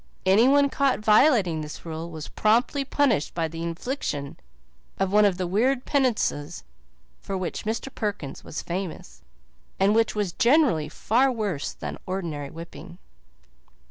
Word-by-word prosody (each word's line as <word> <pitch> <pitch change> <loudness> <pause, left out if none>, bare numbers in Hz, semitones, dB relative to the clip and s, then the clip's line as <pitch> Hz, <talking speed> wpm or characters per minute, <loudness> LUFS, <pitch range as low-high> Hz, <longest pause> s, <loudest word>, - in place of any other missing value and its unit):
Anyone 255 +9 +5
caught 275 -1 +2
violating 210 - +4
this 150 +2 -8
rule 165 +1 -5
was 160 -2 -7
promptly 240 +6 +1
punished 265 - +1
by 165 -1 0
the 165 +1 -7
infliction 170 - -4 0.6
of 195 0 -1
one 210 0 +6
of 195 -3 +2
the 185 - -1
weird 245 +8 +1
penances 240 - 0 0.6
for 195 - -4
which 185 +1 -4
Mr. 225 +5 -3
Perkins 205 -10 -4
was - - -6
famous, 170 - -6 0.6
and 195 +2 +4
which 225 0 +2
were 210 - +1 0.2
generally 240 - +3
far 255 - +2
worse 205 - -3
than - - -7
ordinary 165 -7 -4
whipping. 170 +1 -10
195 Hz, 140 wpm, -25 LUFS, 165-240 Hz, 0.6 s, one